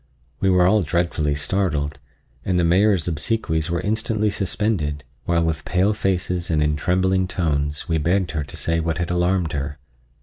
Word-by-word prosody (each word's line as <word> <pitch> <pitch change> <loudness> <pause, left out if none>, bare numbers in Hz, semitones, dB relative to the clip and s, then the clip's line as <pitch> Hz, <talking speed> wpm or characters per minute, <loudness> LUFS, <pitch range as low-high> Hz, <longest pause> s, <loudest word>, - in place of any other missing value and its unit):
We 95 - +2
were 90 -1 +4
all 105 +3 +4
dreadfully 85 -3 0
startled 75 -3 -1 0.4
and 90 -1 0
the 90 - +2
Mayor's 90 +1 +3
obsequies 80 -1 -1
were 85 -1 -1
instantly 110 0 0
suspended, 90 -7 -1 0.2
while 85 -1 +2
with 80 -3 -1
pale 95 +4 +1
faces 90 -3 -1
and 80 -2 +2
in 75 0 +1
trembling 95 +3 +1
tones 75 -5 -1
we 80 -2 +1
begged 85 +3 +1
her 80 -2 -2
to 70 - -10
say 80 0 0
what 80 0 -1
had 85 0 -2
alarmed 90 -1 +1
her. 70 0 -3
85 Hz, 170 wpm, -22 LUFS, 75-95 Hz, 0.4 s, were